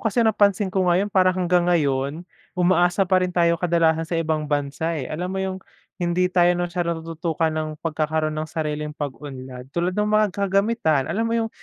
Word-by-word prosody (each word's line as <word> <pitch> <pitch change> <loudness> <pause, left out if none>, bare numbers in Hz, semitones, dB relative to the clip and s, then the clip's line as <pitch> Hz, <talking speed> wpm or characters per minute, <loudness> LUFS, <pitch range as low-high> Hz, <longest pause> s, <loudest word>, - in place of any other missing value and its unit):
kasi, 230 +1 +1
napansin 205 -3 +2
ko 190 -2 +1
ngayon 190 +4 +1
parang 185 -1 +3
hanggang 175 0 +2
ngayon 145 -1 0 0.3
umaasa 175 +1 +3
pa 185 0 +2
rin 185 - 0
tayong 170 -1 +1
kadalasan 165 -2 +2
sa 170 - -1
ibang 160 -2 -1
bansa, 145 +3 -1
eh, 140 - -3
alam 175 +7 -4
mo 190 - -4
yung 190 -1 -2 0.4
hindi 175 +1 +1
tayo 175 -1 +4
masyado 175 -1 -1
natututukan 165 0 -2
ng 155 0 -2 0.2
pagkakaroon 155 0 -1
ng 155 +1 -4
sariling 150 -1 -3
pag-unlad, 130 -2 -7
tulad 175 +5 -1
ng 210 +2 0
mga 215 0 +4
kagamitan 195 - +1
alam 225 +3 -1
mo - - -2
yung 225 -1 0
170 Hz, 180 wpm, -23 LUFS, 155-185 Hz, 0.4 s, tayo